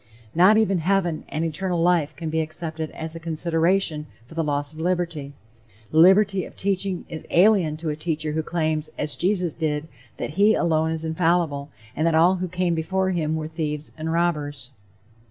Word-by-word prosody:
Not 185 Hz, +6 st, +6 dB
even 195 Hz, -4 st, +2 dB
heaven 175 Hz, -2 st, 0 dB
and 160 Hz, +2 st, -2 dB
eternal 175 Hz, +2 st, -2 dB
life 165 Hz, -3 st, +2 dB
can 160 Hz, -1 st, -5 dB
be 160 Hz, 0 st, +1 dB
accepted 160 Hz, 0 st, -4 dB
as 160 Hz, 0 st, -6 dB
a -, -, -6 dB
consideration 165 Hz, 0 st, 0 dB, 0.2 s
for 125 Hz, -, -14 dB
the 165 Hz, 0 st, -1 dB
loss 145 Hz, 0 st, -1 dB
of 155 Hz, -, -11 dB
liberty. 170 Hz, -5 st, -2 dB, 0.6 s
The 155 Hz, -, -1 dB
liberty 195 Hz, +2 st, +5 dB
of -, -, -11 dB
teaching 195 Hz, -1 st, -1 dB
is 160 Hz, -2 st, -7 dB
alien 180 Hz, -5 st, +4 dB
to 160 Hz, 0 st, -4 dB
a 150 Hz, -, -1 dB
teacher 155 Hz, -1 st, -2 dB
who 160 Hz, +1 st, -1 dB
claims, 155 Hz, -1 st, -1 dB
as 150 Hz, 0 st, -1 dB
Jesus 180 Hz, -3 st, 0 dB
did, 155 Hz, -1 st, -2 dB, 0.3 s
that -, -, -4 dB
he 205 Hz, +6 st, +4 dB
alone 160 Hz, -1 st, +1 dB
is 160 Hz, 0 st, -2 dB
infallible, 160 Hz, -3 st, 0 dB, 0.3 s
and 155 Hz, +2 st, +1 dB
that 165 Hz, -, +2 dB
all 175 Hz, +4 st, +5 dB
who 185 Hz, +1 st, -2 dB
came 180 Hz, 0 st, 0 dB
before 185 Hz, +4 st, 0 dB
him 160 Hz, -3 st, -1 dB
were 155 Hz, -1 st, -3 dB
"thieves 155 Hz, -2 st, -4 dB
and 160 Hz, 0 st, -4 dB
robbers." 150 Hz, -6 st, -1 dB
160 Hz, 185 wpm, -24 LUFS, 155-180 Hz, 0.6 s, Not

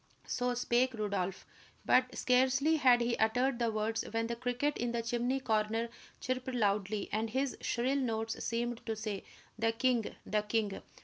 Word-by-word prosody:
So 245 Hz, 0 st, -1 dB
spake 245 Hz, +1 st, +2 dB
Rodolph; 200 Hz, -3 st, -2 dB, 0.4 s
but 255 Hz, 0 st, +3 dB
scarcely 265 Hz, +5 st, +3 dB
had 250 Hz, -4 st, +5 dB
he 235 Hz, 0 st, +1 dB
uttered 245 Hz, +3 st, +2 dB
the 235 Hz, -1 st, +1 dB
words 220 Hz, +1 st, -1 dB
when 225 Hz, +1 st, -1 dB
the 235 Hz, +1 st, -2 dB
cricket 245 Hz, +5 st, -1 dB
in 240 Hz, 0 st, 0 dB
the 235 Hz, -1 st, -1 dB
chimney 240 Hz, +3 st, 0 dB
corner 225 Hz, -1 st, 0 dB, 0.3 s
chirped 255 Hz, 0 st, -2 dB
loudly, 205 Hz, -2 st, 0 dB
and 220 Hz, +1 st, 0 dB
his 265 Hz, +3 st, -1 dB
shrill 255 Hz, +4 st, 0 dB
notes 225 Hz, -3 st, -2 dB
seemed 235 Hz, 0 st, -2 dB
to 225 Hz, -, -1 dB
say: 215 Hz, -2 st, -4 dB, 0.4 s
"The 225 Hz, 0 st, +3 dB
king 240 Hz, -1 st, +1 dB
the 210 Hz, 0 st, +1 dB
king." 210 Hz, -1 st, -1 dB
235 Hz, 165 wpm, -33 LUFS, 220-250 Hz, 0.4 s, had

